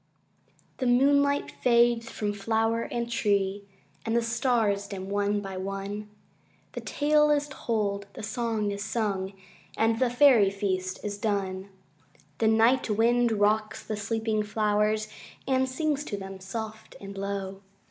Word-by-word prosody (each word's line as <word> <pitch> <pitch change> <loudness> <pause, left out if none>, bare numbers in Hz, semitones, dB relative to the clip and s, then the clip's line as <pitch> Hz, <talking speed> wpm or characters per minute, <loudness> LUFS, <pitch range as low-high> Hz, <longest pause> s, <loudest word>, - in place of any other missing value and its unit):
The 255 - -1
moonlight 280 +3 +3
fades 235 -1 +3
from 205 -1 -2
flower 225 +2 0
and 235 0 -3
tree, 200 -3 0 0.4
And 225 0 -1
the 235 - +2
stars 230 -4 +1
dim 195 -1 -6
one 205 0 0
by 195 -1 -6
one; 195 +2 -5 0.6
The - - -6
tale 300 +1 +2
is 295 0 +2
told, 205 -6 -2
the - - -8
song 220 -2 -1
is 200 0 -4
sung, 200 -4 -2 0.4
And 225 0 +2
the 255 - +3
Fairy 245 -5 +6
feast 190 -2 -2
is 205 -1 -4
done. 195 -2 -2 0.7
The 220 - +3
night 225 +3 +3
wind 235 +2 +3
rocks 215 +1 +1
the 215 - -3
sleeping 220 +1 -1
flowers, 210 0 +1 0.4
And 260 -1 +2
sings 295 +1 -1
to 205 - -4
them, 195 -1 -8
soft 220 +3 -7
and 200 0 -9
low. 195 0 -4
215 Hz, 140 wpm, -27 LUFS, 200-235 Hz, 0.7 s, Fairy